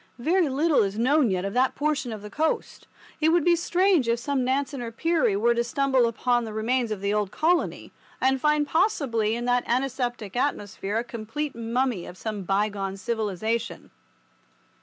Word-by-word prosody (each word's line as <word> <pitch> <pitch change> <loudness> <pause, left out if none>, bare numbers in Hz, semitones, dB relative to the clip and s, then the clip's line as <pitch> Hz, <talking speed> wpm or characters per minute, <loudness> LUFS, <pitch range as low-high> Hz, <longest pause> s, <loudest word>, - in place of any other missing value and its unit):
Very 325 +6 +2
little 295 +3 +2
is 200 0 -1
known 260 +2 +3
yet 185 0 -1
of 195 - -3
that 255 +1 +2
portion 290 -4 -1
of 215 -2 -7
the 210 - -9
coast. 315 +5 -2 0.3
It 315 - +3
would 335 -1 +3
be 350 -1 +5
strange 350 -4 +2
if 235 - +2
some 265 +2 -1
Nansen 270 +1 -1
or 235 -1 -5
Peary 325 -3 +1
were 235 +4 +3
to 235 0 0
stumble 265 0 +2
upon 240 +1 0
the 220 -2 -6
remains 235 +2 0
of 210 -3 -4
the 200 +1 0
old 210 -2 0
colony, 335 - 0 0.3
and 265 0 +2
find 300 -1 +2
possibly 265 - +1
in 240 +1 -4
that 245 0 +2
antiseptic 245 -4 -2
atmosphere 210 -6 -2
a 230 - 0
complete 240 +5 -5
mummy 235 -3 -1
of 180 - -10
some 215 -1 -4
bygone 195 0 -1
civilization. 220 +2 -3
240 Hz, 180 wpm, -25 LUFS, 215-285 Hz, 0.3 s, be